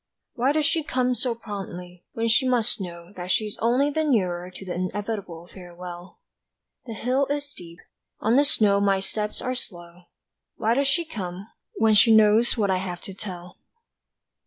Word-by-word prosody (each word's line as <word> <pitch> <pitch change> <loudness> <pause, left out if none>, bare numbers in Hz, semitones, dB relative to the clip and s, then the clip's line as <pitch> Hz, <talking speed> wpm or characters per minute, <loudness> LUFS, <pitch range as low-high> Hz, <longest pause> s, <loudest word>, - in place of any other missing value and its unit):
Why 260 +2 +2
does 305 0 +1
she 325 0 +1
come 255 -3 +1
so 245 -1 -1
promptly, 180 -5 -8
when 230 0 -1
she 240 +3 +3
must 235 -4 +1
know 170 0 -8
That 180 0 -6
she's 210 +2 0
only 250 +6 +2
the 315 +2 0
nearer 180 - 0
to 190 +1 -10
the 180 - -4
inevitable 185 -2 -4
farewell; 175 -1 -10 0.7
The 225 - -5
hill 255 +6 +1
is 285 0 -2
steep, 170 -12 -12 0.4
on 225 +3 +2
the 285 - +6
snow 210 -9 +3
my 195 -1 +3
steps 210 +2 -4
are 255 - -1
slow 175 -7 -7 0.5
Why 225 0 +1
does 275 +3 +2
she 335 +5 +2
come, 195 - -6 0.3
when 220 0 +4
she 220 +2 +7
knows 220 +3 +5
what 200 -3 +2
I 185 - +2
have 180 -2 -5
to 195 - -6
tell? 180 -2 -8
210 Hz, 175 wpm, -25 LUFS, 180-245 Hz, 0.7 s, she